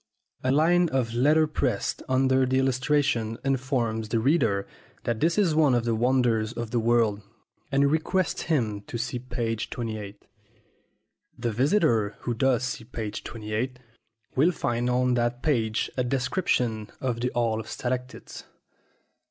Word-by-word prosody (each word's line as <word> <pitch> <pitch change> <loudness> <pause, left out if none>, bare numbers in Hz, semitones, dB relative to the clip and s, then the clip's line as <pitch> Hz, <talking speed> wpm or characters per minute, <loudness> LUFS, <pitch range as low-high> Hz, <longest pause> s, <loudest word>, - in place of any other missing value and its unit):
A 130 - +2
line 170 +4 +4
of 125 -5 -1
letterpress 150 0 +2
under 130 0 +3
the 130 +1 +1
illustration 130 -3 +1
informs 125 -5 -1
the 115 - +1
reader 115 -7 +2 0.4
that 115 -2 -1
this 165 +4 +2
is 190 -6 +3
one 150 -5 +4
of 120 -1 0
the 115 - +1
wonders 120 -2 +1
of 115 -2 -5
the 120 - +1
world, 115 -3 +2 0.5
and 140 +1 +3
requests 170 +4 0
him 110 -10 0
to 120 - -4
"see 120 +1 -3
p. 120 -2 -2
28." 105 -3 -5 1.1
The 120 - -2
visitor 120 - +2
who 120 - -2
does 125 0 +2
"see 125 -2 -3
p. 110 -2 -5
28" 110 +4 -4 0.6
will 155 +7 +4
find 120 -6 -1
on 125 0 +2
that 120 0 0
page 115 -7 0
a 125 - +1
description 125 - 0
of 125 -3 -2
the 125 +1 0
Hall 115 -2 +1
of 110 - -7
Stalactites. 125 +1 -5
125 Hz, 145 wpm, -26 LUFS, 115-135 Hz, 1.1 s, line